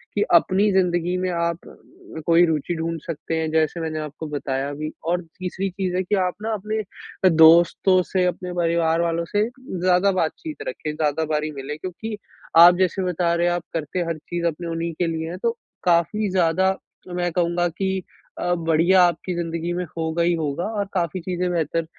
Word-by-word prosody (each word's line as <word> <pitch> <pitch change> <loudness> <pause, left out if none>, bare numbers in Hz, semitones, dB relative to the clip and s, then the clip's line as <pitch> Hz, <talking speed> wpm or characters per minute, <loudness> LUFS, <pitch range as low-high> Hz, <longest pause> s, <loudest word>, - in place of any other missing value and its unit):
कि 205 - +1
अपनी 195 +4 +4
ज़िंदगी 175 -1 +1
में 185 0 -1
आप 170 0 -2
अ, 160 - -13
कोई 170 +1 +5
रूचि 160 +1 -1
ढूँढ़ 165 0 -2
सकते 165 0 -4
हैं, 160 -1 -1
जैसे 160 +1 +1
मैंने 155 -1 -3
आपको 155 +1 -6
बताया 140 -1 -3
भी 155 +1 -4 0.2
और 175 +1 +1 0.2
तीसरी 185 +1 -3
चीज़ 185 -1 -2
है 185 - +1
कि 195 +3 0
आप 180 - -3
ना 225 0 -1
अपने 215 +1 -3 0.5
अ, - - +8
दोस्तों 170 +3 +6
से, 185 0 0
अपने 180 0 -2
परिवार 170 -1 +1
वालों 170 0 0
से 205 0 +2 0.2
ज़्यादा 185 -3 +1
बातचीत 185 - -3
रखें, 465 - -4
ज़्यादा 155 0 0
बारी 155 0 -1
मिले 145 +1 -6
क्योंकि 200 +6 -6 0.4
आप 175 +1 +9
जैसे 185 +1 +1
बता 175 -1 0
रहे 170 +1 +2
हैं 175 - +2
आप 175 -1 -2
करते 165 +3 -3
हर 165 -1 -2
चीज़ 170 +2 -4
अपने 170 +2 -4
उन्हीं 165 0 -3
के 175 - +1
लिए 160 0 -3
हैं, 180 - -5
तो 230 +3 +1 0.3
काफ़ी 180 +5 +2
ज़्यादा 185 +1 +2 0.4
मैं 175 -1 0
कहूँगा 175 0 +1
कि 190 +2 -2 0.4
अ, 175 0 0
बढ़िया 170 +2 +3
आपकी 175 +1 0
ज़िंदगी 170 0 -3
में 180 0 -2
होगा 165 +1 0
ही 175 0 +3
होगा 160 0 -2
और 200 - 0
काफ़ी 180 -1 -1
चीज़े 180 0 -2
बेहतर 165 -1 -1
170 Hz, 190 wpm, -23 LUFS, 160-185 Hz, 0.5 s, आप